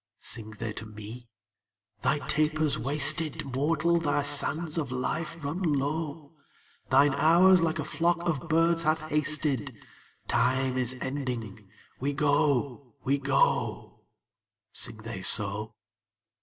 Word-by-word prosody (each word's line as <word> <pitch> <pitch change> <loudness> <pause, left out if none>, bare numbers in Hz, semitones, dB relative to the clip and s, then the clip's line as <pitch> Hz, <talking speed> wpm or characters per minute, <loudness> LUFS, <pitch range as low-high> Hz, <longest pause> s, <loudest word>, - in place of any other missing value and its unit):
Sing 110 -2 -4
they 110 0 -4
to 110 - -7
me? 110 +3 -10 0.7
'Thy 145 -1 0
taper's 155 0 +1
wasted; 145 +5 0
Mortal, 165 +4 +1
thy 145 -3 0
sands 155 +3 +1
of 140 -5 -4
life 155 +6 -3
run 160 +7 -3
low; 150 -1 -2 0.6
Thine 140 +2 +4
hours 170 +5 +5
like 160 -1 0
a - - -2
flock 170 +1 -1
of 165 0 -2
birds 165 +1 +3
have 155 0 +1
hasted: 150 -4 -2 0.5
Time 130 0 +1
is 130 0 -1
ending; 120 -7 -5 0.3
we 140 +3 -1
go, 140 -3 0
we 140 +2 +1
go.' 135 0 0 0.7
Sing - - -3
they 110 -3 -7
so? 105 +3 +4
145 Hz, 120 wpm, -28 LUFS, 125-155 Hz, 0.7 s, hours